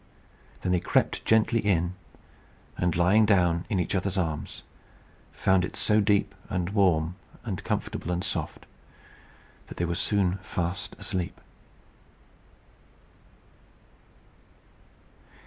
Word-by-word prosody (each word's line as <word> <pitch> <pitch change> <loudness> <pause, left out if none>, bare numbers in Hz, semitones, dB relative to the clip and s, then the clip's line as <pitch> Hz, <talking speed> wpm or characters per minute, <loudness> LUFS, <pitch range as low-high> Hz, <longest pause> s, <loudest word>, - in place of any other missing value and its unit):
Then 90 - -1
they 90 - +3
crept - - +1
gently 110 +1 +3
in, 90 -4 +1 0.8
and, 90 -2 0
lying 90 +6 +5
down 90 -5 +3
in 100 - +1
each 85 - -1
other's 95 0 -1
arms, 80 -5 -3 0.7
found 95 -1 +2
it 90 - -4
so 105 0 +3
deep, 100 -1 +2 0.2
and 90 +1 -2
warm, 90 -4 +2 0.3
and - - -4
comfortable, 90 - -3
and 90 0 -1
soft, - - -3 1.0
that - - -10
they 85 - 0
were 85 - -1
soon 95 0 +1
fast 90 +4 -3
asleep. 90 -4 -3
90 Hz, 110 wpm, -27 LUFS, 85-100 Hz, 1.0 s, lying